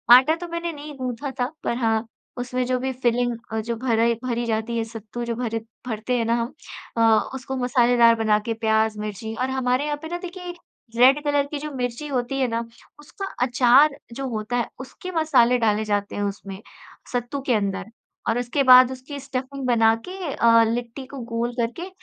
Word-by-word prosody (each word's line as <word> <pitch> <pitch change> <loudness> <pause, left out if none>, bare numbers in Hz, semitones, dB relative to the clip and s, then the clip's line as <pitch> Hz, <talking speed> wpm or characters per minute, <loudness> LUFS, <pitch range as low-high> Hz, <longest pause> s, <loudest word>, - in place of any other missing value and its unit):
आटा 265 +6 +5
तो 350 +1 -7
मैंने 335 0 -3
नहीं 295 0 -8
गूँथा 255 +1 -4
था 250 +2 0
पर 235 - -1
हाँ, 225 -2 +1 0.3
उसमें 250 +1 -2
जो 255 0 0
भी 265 +1 -2
फ़िलिंग 245 -1 0 0.2
अ, 220 - 0
जो 230 +2 -3
भरा 230 -1 +2 0.2
भरी 240 -1 -1
जाती 225 +1 -1
है 230 - 0
सत्तू 225 +1 -7
जो 235 0 -2
भर 230 -1 -2 0.3
भरते 230 +2 -1
हैं 230 - 0
ना 230 - +1
हम 235 +4 -4 0.4
अ, 225 -1 +4
उसको 265 0 -5
मसालेदार 245 -2 +4
बना 215 -2 +2
के 230 - -1
प्याज़, 220 -1 +1
मिर्ची 215 +1 -5
और 255 - 0
हमारे 260 +1 0
यहाँ 295 0 -1
पे 320 - -6
ना 350 - -2
देखिए 360 0 -7 0.4
रेड 265 +4 +6
कलर 290 -1 +2
की 295 - -5
जो 300 +1 -5
मिर्ची 250 +2 -3
होती 270 0 -2
है 260 - +2
ना 230 0 -2 0.4
उसका 300 +7 -7 0.2
अचार 260 +4 +5 0.2
जो 270 +2 -4
होता 220 +1 -3
है 240 - 0
उसके 270 +7 -8
मसाले 310 -8 +4
डाले 215 -2 +1
जाते 205 -1 -1
हैं 205 - -2
उसमें 200 -1 -5 0.5
सत्तू 245 +3 -2
के 250 - +3
अंदर 195 -2 -1 0.4
और 225 +2 +1
उसके 245 +4 0
बाद 255 -1 +8
उसकी 260 +2 -7
स्टफ़िंग 270 0 -5
बना 225 -2 +4
के 365 -6 -5
अ, 230 0 +5
लिट्टी 235 +3 -3
को 275 +1 -9
गोल 235 +1 -1
करके 245 +11 -3
245 Hz, 195 wpm, -23 LUFS, 230-270 Hz, 0.5 s, बाद